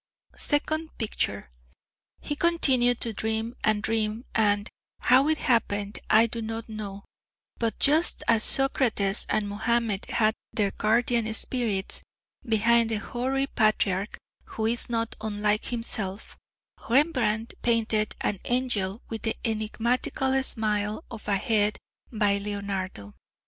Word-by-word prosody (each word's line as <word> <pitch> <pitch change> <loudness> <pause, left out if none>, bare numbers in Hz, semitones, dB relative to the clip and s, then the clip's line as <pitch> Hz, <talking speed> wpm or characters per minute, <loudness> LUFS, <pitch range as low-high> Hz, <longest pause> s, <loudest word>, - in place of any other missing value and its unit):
Second 315 +2 0
picture. 215 - -2 0.7
He 290 - -3
continued 265 -8 +3
to 230 - -1
dream 220 +2 -2
and 215 -1 +2
dream 220 +1 -1
and, 205 -1 +2 0.3
how 260 +3 +4
it 315 0 +2
happened 205 -6 0
I 220 +2 +6
do 230 0 -5
not 225 0 -5
know, 205 -3 -7 0.5
but 230 -1 0
just 310 +4 +3
as 225 -2 +4
Socrates 235 -7 +2
and 210 -1 0
Muhammed 220 0 0
had 220 -1 +2 0.2
their 205 -3 0
guardian 230 +1 +1
spirits, 225 -6 -1 0.4
behind 230 +1 +3
the 225 - 0
hoary 255 +6 -1
patriarch 215 -5 0 0.3
who 220 - -4
is 235 +2 0
not 230 -1 -1
unlike 210 0 0
himself, 220 -4 -4 0.5
Rembrandt 235 -5 +2
painted 225 -2 +1
an 200 - -1
angel 240 -5 0
with 225 -1 -5
the 225 - -1
enigmatical 235 +4 0
smile 215 0 0
of 225 -3 -9
a 200 -1 +2
head 210 -1 +1 0.3
by 205 -3 +1
Leonardo.... 195 - -5
220 Hz, 125 wpm, -26 LUFS, 210-240 Hz, 0.7 s, I